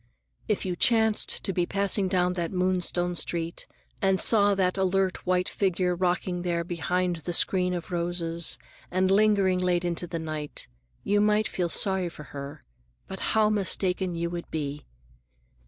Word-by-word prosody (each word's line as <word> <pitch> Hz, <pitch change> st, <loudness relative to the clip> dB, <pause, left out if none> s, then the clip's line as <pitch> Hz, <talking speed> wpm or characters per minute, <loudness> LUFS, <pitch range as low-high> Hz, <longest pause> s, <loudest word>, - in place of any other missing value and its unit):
If 210 Hz, -, 0 dB
you 180 Hz, -2 st, -2 dB
chanced 220 Hz, +2 st, +2 dB
to 195 Hz, -, -2 dB
be 175 Hz, -1 st, 0 dB
passing 200 Hz, 0 st, +1 dB
down 180 Hz, -1 st, +1 dB
that 170 Hz, -2 st, -3 dB
Moonstone 180 Hz, -1 st, 0 dB
street 170 Hz, +1 st, -1 dB, 0.3 s
and 195 Hz, -1 st, +2 dB
saw 205 Hz, -3 st, +4 dB
that 185 Hz, -1 st, +1 dB
alert 190 Hz, -1 st, 0 dB
white 180 Hz, 0 st, +2 dB
figure 185 Hz, -2 st, 0 dB
rocking 180 Hz, 0 st, -1 dB
there 170 Hz, -1 st, -1 dB
behind 175 Hz, +1 st, -1 dB
the 175 Hz, +2 st, -5 dB
screen 180 Hz, +1 st, +2 dB
of 175 Hz, +1 st, -6 dB
roses 170 Hz, -1 st, -1 dB, 0.3 s
and 185 Hz, +1 st, +1 dB
lingering 200 Hz, -2 st, +3 dB
late 180 Hz, -1 st, +1 dB
into 175 Hz, 0 st, -2 dB
the 170 Hz, -, -4 dB
night, 155 Hz, -2 st, -4 dB, 0.4 s
you 205 Hz, 0 st, +2 dB
might 210 Hz, 0 st, +3 dB
feel 175 Hz, -2 st, -2 dB
sorry 190 Hz, -1 st, +1 dB
for 150 Hz, -, -11 dB
her, 140 Hz, 0 st, -7 dB, 0.5 s
and 190 Hz, -, -6 dB
how 215 Hz, -1 st, +2 dB
mistaken 190 Hz, -3 st, 0 dB
you 170 Hz, 0 st, -2 dB
would 170 Hz, -1 st, -6 dB
be! 145 Hz, -2 st, -4 dB
180 Hz, 155 wpm, -27 LUFS, 170-190 Hz, 0.5 s, saw